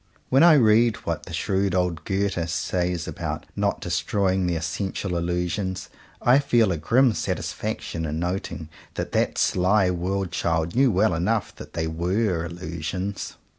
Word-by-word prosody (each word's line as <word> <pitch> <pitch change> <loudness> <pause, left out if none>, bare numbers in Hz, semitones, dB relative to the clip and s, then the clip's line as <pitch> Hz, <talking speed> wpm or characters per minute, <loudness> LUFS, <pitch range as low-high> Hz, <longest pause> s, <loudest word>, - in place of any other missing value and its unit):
When 135 - +4
I 170 0 +8
read 115 -4 +5
what - - -3
the - - -8
shrewd 95 -1 0
old 90 -4 -1
Goethe 95 -3 -1
says 85 +1 -1
about - - -4
not 100 0 0
destroying 95 +1 0
the 85 - 0
essential 90 +3 -3
Illusions, 90 +2 -2 0.3
I 125 +3 +6
feel 120 -7 +3
a 85 - -1
grim 120 - +3
satisfaction 80 -5 -3
in 75 +1 -3
noting 85 -2 -3 0.3
that - - -3
that - - 0
sly 95 +1 +3
world 90 +1 -2
child 80 +2 -1
knew 135 +1 +5
well 100 -1 +3
enough 100 +6 -1
that - - -10
they 80 -1 -1
were 85 +3 0
Illusions. 85 +3 -5
90 Hz, 150 wpm, -24 LUFS, 85-100 Hz, 0.3 s, I